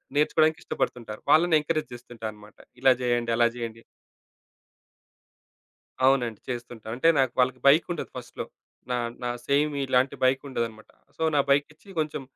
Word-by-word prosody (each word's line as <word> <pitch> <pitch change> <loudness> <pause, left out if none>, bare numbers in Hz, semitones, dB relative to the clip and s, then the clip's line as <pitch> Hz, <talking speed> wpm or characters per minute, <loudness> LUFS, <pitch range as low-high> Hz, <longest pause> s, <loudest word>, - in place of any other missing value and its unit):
నేర్చుకోవడానికి 155 +2 +3
ఇష్టపడుతుంటారు. 110 -3 -3
వాళ్ళని 165 +2 +5
ఎంకరేజ్ 155 -2 -2
చేస్తుంటారన్నమాట. 110 -3 -9 0.2
ఇలా 130 - +6
చేయండి, 120 -1 0
అలా 120 -1 +5
చేయండి. 115 -1 -6 2.2
అవునండి. 125 -5 +2
చేస్తుంటా. 120 -2 -6
అంటే 130 +6 +1
నాక్ 130 -3 +2
వాళ్ళకి 130 0 +2
బైకుండదు 160 +3 +3
ఫస్ట్‌లో 125 -1 -7 0.5
నా 125 - +1 0.3
నా 120 - -1 0.2
సేమ్ 145 +1 +2
ఇలాంటి 130 +2 +2
బైకుండదన్నమాట. 130 -4 -1 0.3
సో, - - -9
నా - - +4
బైకిచ్చి 150 +6 0
కొంచెం 150 -2 -2
130 Hz, 120 wpm, -26 LUFS, 120-145 Hz, 2.2 s, ఇలా